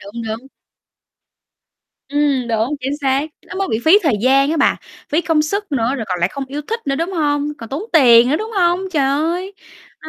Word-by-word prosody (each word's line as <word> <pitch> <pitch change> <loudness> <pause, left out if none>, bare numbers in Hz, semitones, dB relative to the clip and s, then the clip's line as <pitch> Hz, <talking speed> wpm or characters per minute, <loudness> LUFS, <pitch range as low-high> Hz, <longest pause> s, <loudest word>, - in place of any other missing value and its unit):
Đúng, 230 +4 -8
đúng. 225 +4 -5 1.6
Ừm, 280 -4 0
đúng, 225 +5 0
chính 270 +3 -2
xác. 275 +1 +1 0.2
Nó - - -9
mới 390 - -1
bị 220 - 0
phí 360 +6 +7
thời 295 -8 +2
gian 275 +3 +4
á 330 - 0
bà, - - +3 0.3
phí 310 +4 +1
công 320 -3 +1
sức 400 +2 -3
nữa 245 0 0
rồi 225 - -4
còn 180 -1 -2
lại 175 - +2
không 275 +6 -6
yêu 280 +3 -5
thích 455 +1 -3
nữa, 275 - 0
đúng 335 +5 -2
hông? 295 -3 0
Còn 230 - -9
tốn 290 +8 -4
tiền 245 -6 +6
nữa, 300 - +2
đúng 440 +2 -5
hông? 350 -1 +2
Trời 290 -4 +2
ơi, 340 +7 -1 0.5
đó, 315 - -8
285 Hz, 215 wpm, -18 LUFS, 255-330 Hz, 1.6 s, phí